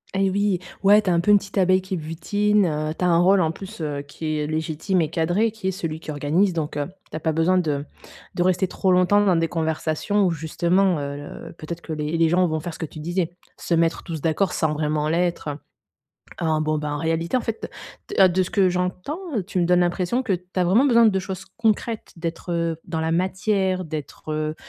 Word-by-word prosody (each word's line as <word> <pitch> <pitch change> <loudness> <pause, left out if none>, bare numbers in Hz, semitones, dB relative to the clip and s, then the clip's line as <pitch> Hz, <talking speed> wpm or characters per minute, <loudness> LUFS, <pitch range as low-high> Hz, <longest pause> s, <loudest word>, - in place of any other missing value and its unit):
Et 195 0 +2
oui! 200 -1 +1 0.3
Ouais, 205 +2 +7
tu 195 - 0
es - - +3
un 170 - +3
peu 175 - -1
une 205 - +8
petite 195 0 -7
abeille 185 0 +4
qui 190 0 -3
butine, 200 +6 +1
heu, 155 -1 -1
tu 180 - 0
as - - +4
un 170 -1 +4
rôle 190 +2 +5
en 160 -2 +1
plus, 195 +5 -10
heu, 145 -2 -2
qui 155 +2 -4
est 150 - -1
légitime 160 +4 -1
et 155 - 0
cadré 175 +7 +1
qui 215 -3 -5
est - - +2
celui 165 -4 -4
qui 160 - -11
organise 155 +7 +1
donc 155 -3 -3
heu, 145 - -1 0.2
tu - - -7
as - - -5
pas 160 +1 0
besoin 165 +4 +3
de 145 -4 -1 0.5
de 175 - +1
rester 185 +1 +2
trop 185 +1 0
longtemps 185 +3 +4
dans 190 -3 +3
des 165 0 +2
conversations 160 +5 0
où 180 - +2
justement, 170 +3 +1
heu, 140 0 -4 0.3
le - - -10
peut-être 170 +2 -7
que 160 - -6
les 150 +1 -2
les 165 -1 +3
gens 180 +2 +3
vont 160 -1 -1
faire 170 +1 -6
ce - - -11
que - - -2
tu 155 - -11
disais. 175 +2 -1 0.3
Se 170 - -1
mettre 165 0 +1
tous 165 -3 -5
d'accord 165 +5 +1
sans 155 -2 +1
vraiment 150 0 0
l'être, 170 -1 0 0.9
heu, - - 0
en 155 -1 +1
bon 155 0 0
bah, 150 0 -3
en 145 - -2
réalité 165 - 0
en - - -1
fait 225 -1 -4 0.4
t 410 - -3
heu, 190 - +9
de 185 +1 +2
ce - - -6
que 195 -4 +3
j'entends, 180 - -2 0.3
tu 190 - -1
me 175 - +2
donnes 180 +1 +4
l'impression 180 +7 0
que 220 -6 0
tu 180 0 -4
as 185 - +3
vraiment 200 +10 +4
besoin 235 -4 +5
de 195 -3 +2
choses 190 0 -6
concrètes, 225 0 -1
d'être, 165 +1 -5
heu, 165 -1 -1
dans 160 -1 -3
la 160 0 0
matière, 190 +1 0
d'être, 155 0 -6
heu, 155 0 -2
175 Hz, 240 wpm, -23 LUFS, 160-190 Hz, 0.9 s, heu